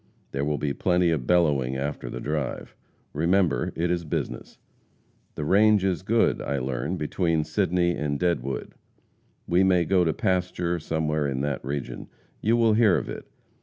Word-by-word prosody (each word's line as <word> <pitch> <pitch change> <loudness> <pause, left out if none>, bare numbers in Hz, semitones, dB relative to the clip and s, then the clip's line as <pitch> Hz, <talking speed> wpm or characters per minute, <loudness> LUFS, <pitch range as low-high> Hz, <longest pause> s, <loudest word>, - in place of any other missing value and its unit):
There 70 +1 -2
will 75 0 0
be 70 -1 -1
plenty 90 0 +2
of 70 -7 -2
bellowing 70 -7 +2
after 70 -3 -4
the - - -6
drive. 75 -2 -3 0.4
Remember, 85 -4 +1
it 85 +1 0
is 85 -1 -1
business. 75 - -4 0.8
The 75 - -4
range 105 +3 +4
is 95 -3 0
good, 110 +4 +2
I 70 - -2
learn, 65 -2 -2
between 80 +1 0
Sidney 85 +2 +1
and 75 -4 -2
Deadwood. 75 -7 -2 0.7
We 90 +2 +3
may 90 -2 +3
go 95 +1 +3
to 80 - +2
pasture 90 -1 -1
somewhere 75 -2 -1
in 65 -1 -2
that 70 -2 -2
region. 70 0 -5 0.3
You 115 +2 +2
will 115 -2 +4
hear 105 -4 +4
of - - -4
it. - - -7
80 Hz, 165 wpm, -25 LUFS, 70-90 Hz, 0.8 s, range